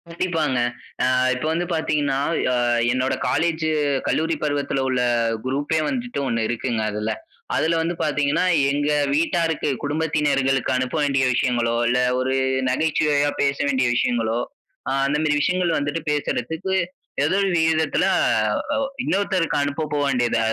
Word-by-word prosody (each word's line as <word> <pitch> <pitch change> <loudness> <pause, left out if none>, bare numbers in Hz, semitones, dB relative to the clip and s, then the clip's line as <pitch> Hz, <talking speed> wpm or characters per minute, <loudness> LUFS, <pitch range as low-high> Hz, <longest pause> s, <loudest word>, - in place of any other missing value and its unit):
கண்டிப்பாங்க. 165 -6 -1 0.5
ஆ - - +2 0.2
இப்ப 130 +4 -4
வந்து 170 +2 0
பார்த்தீங்கன்னா, 150 -4 0 0.3
ஆ - - +1 0.4
என்னோட 130 +1 0
காலேஜ் 160 +4 0 0.4
கல்லூரி 160 +1 +1
பருவத்தில்லுள்ள 135 -3 0 0.4
குரூப்பே 145 +4 -1
வந்துட்டு 245 - -3
ஒன்னு 115 -3 0
இருக்குங்க 120 -1 -2
அதில. 105 +1 -2 0.4
அதில 165 +1 +1
வந்து 170 +2 -1
பார்த்தீங்கன்னா, 150 +2 +1 0.3
எங்க 145 +1 0 0.2
வீட்டாருக்கு 165 0 0
குடும்பத்தினர்களுக்கு 145 -3 0
அனுப்ப 125 +3 -2
வேண்டிய 140 -2 +2
விஷயங்களோ, 120 -1 +1
இல்ல, 125 +1 +2 0.2
ஒரு 130 +1 0 0.3
நகைச்சுவையா 145 +1 +1
பேச 140 0 +1
வேண்டிய 130 -2 +1
விஷயங்களோ 115 -2 0 0.5
அ - - 0
அந்த 140 +2 0
மாதிரி 150 -2 +2
விஷயங்கள் 175 +1 +1
வந்துட்டு, 145 +3 -2
பேசறதுக்கு 150 +5 -2 0.5
ஏதோ 160 +5 +1
ஒரு 195 - +1
விகிதத்தில 160 -1 +2 1.0
இன்னொருத்தருக்கு 190 -4 0
அனுப்ப 145 +2 -2
போக 145 - +1
வேண்டியது, 120 -3 +1
145 Hz, 125 wpm, -22 LUFS, 130-160 Hz, 1.0 s, ஆ